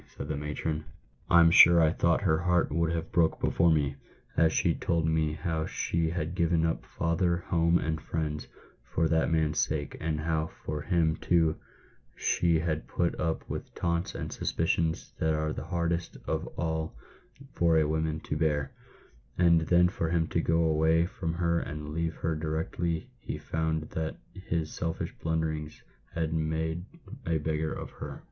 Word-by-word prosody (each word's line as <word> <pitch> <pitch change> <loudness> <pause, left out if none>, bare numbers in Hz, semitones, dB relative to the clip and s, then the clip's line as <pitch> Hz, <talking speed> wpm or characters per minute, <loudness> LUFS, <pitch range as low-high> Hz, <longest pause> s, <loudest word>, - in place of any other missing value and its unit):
said 70 - -5
the 75 - -1
matron. 75 +2 -3 0.2
" 65 +1 -34
I'm 85 -1 +7
sure 85 -1 +8
I 80 -2 +5
thought - - +2
her 80 0 +2
heart 90 0 +2
would 85 +2 +1
have 85 +1 -3
broke 85 -2 +2
before 85 +1 +3
me, 70 -3 +1 0.4
as 80 -1 +4
she - - +2
told 85 -2 0
me 80 -1 +1
how 80 -1 -2
she 85 -1 -1
had 80 0 -3
given 85 -2 +2
up 80 - -1
father, 85 +1 0
home, 85 0 +3
and 80 -2 -2
friends, 75 -2 -3 0.4
for 80 - 0
that 80 0 +2
man's 80 -1 +1
sake, 75 -3 -1
and 75 -1 -2
how 80 0 0 0.2
for 75 -1 -3
him, 80 -2 +1
too, 80 -3 +2 0.6
she 85 -2 +2
had 80 -2 -2
put 85 -1 -1
up 80 -2 -1
with - - -6
taunts 85 +1 -1
and - - -4
suspicions 80 0 -1
that 80 0 +2
are 75 0 -1
the - - -6
hardest 85 0 -2
of - - -2
all 80 -1 -2 0.6
for 85 -1 +3
a 80 -1 +3
woman 80 0 -1
to - - -3
bear; 75 -3 0 0.7
and 85 -2 +5
then 90 0 +5
for 85 -3 -2
him 85 -1 +2
to - - +1
go 80 +1 +2
away 80 +1 +3
from 85 -2 -4
her 85 -1 +1
and 75 -1 -5
leave 80 0 -1
her 80 -1 -1
directly 80 +1 -2
he - - -5
found 80 -1 -1
that 80 0 -3 0.2
his 85 -4 -3
selfish 80 -2 -3
blunderings 80 -2 -2 0.3
had 80 -1 -1
made 80 +2 -1 0.4
a 85 -1 +2
beggar 80 +1 -1
of - - -6
her - - -8
80 Hz, 170 wpm, -29 LUFS, 80-85 Hz, 0.7 s, sure